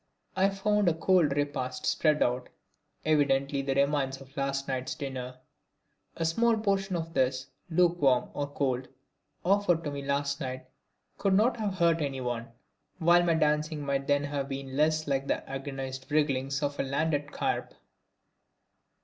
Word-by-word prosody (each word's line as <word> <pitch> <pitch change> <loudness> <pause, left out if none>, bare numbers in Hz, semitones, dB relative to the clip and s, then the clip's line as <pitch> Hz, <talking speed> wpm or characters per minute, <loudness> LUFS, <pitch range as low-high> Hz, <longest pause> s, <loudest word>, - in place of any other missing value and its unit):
I 190 +1 +3
found 200 0 +2
a 165 - 0
cold 165 -4 +3
repast 130 -3 -2
spread 155 -2 +3
out, 125 +1 -1 0.6
evidently 140 -2 +2
the 135 0 -1
remnants 140 -1 +1
of 135 +1 -15
last 140 -1 -1
night's 130 -1 -2
dinner. 130 -2 -5 0.8
A 165 - -1
small 230 +8 +3
portion 195 -3 0
of 165 -1 -4
this, 130 0 0 0.2
lukewarm 160 -7 +3
or 145 0 -2
cold, 130 -3 -1 0.6
offered 185 -3 +3
to 145 - -3
me 140 0 -4
last 140 +1 -1
night 130 -1 -4 0.5
could 195 -1 +2
not 230 +4 +3
have 210 -4 -2
hurt 170 -2 +3
anyone, 125 -4 -2 0.5
while 175 0 +5
my 170 -1 +2
dancing 150 -1 +1
might 140 -1 -1
then 145 0 +2
have 140 -1 -3
been 135 -1 -5
less 155 +1 +2
like 140 -1 -1
the - - -1
agonised 135 -1 -5
wrigglings 140 -2 0
of 145 0 -2
a - - +2
landed 145 +1 -1
carp. - - -2
145 Hz, 150 wpm, -29 LUFS, 135-165 Hz, 0.8 s, while